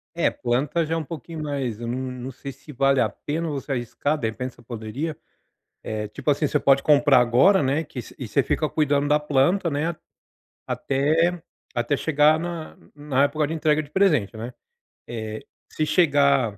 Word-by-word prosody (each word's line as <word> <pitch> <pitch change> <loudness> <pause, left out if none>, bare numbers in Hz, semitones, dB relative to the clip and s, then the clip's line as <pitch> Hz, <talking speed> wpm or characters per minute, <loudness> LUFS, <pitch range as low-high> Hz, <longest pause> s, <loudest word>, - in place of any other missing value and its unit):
É, - - +2
planta 140 +7 0
já 160 - -3
é - - +1
um 165 - -2
pouquinho 160 +1 -7
mais, 135 -7 -3
hum, - - -11
eu - - -3
não, 120 +2 -2 0.3
não 130 - -5
sei 135 +2 -8
se 140 +3 -14
vale 135 0 +2
a 110 - +2
pena 155 +10 -4
você 140 -1 -5
arriscar. 135 +4 -1
De 115 - -1
repente 125 +3 -4
você - - -19
poderia 120 +7 -5 0.7
eh, 105 -1 -3
tipo 105 - -8
assim, 145 +1 0
você - - +1
pode 135 0 +4
comprar 145 -2 +5
agora, 130 +12 +4
né. 140 +4 +1
Que 140 -5 -7
se - - -13
e 130 - -5
você 125 +6 +2
fica 155 +4 0
cuidando 145 -2 +1
da 150 +1 +3
planta, 150 +5 +2
né 155 +4 -1 0.7
até, 160 +5 +1 0.3
até 120 +4 +1
chegar 150 +1 +3
na 170 -1 -5 0.2
na 145 -2 +1
época 150 +1 0
de 155 - -4
entrega 155 -1 +1
de 145 - -16
presente, 150 - +2
né 115 +3 -6 0.6
eh, 110 -2 -5 0.3
se 155 - 0
chegar 140 - +3
145 Hz, 190 wpm, -24 LUFS, 125-155 Hz, 0.7 s, comprar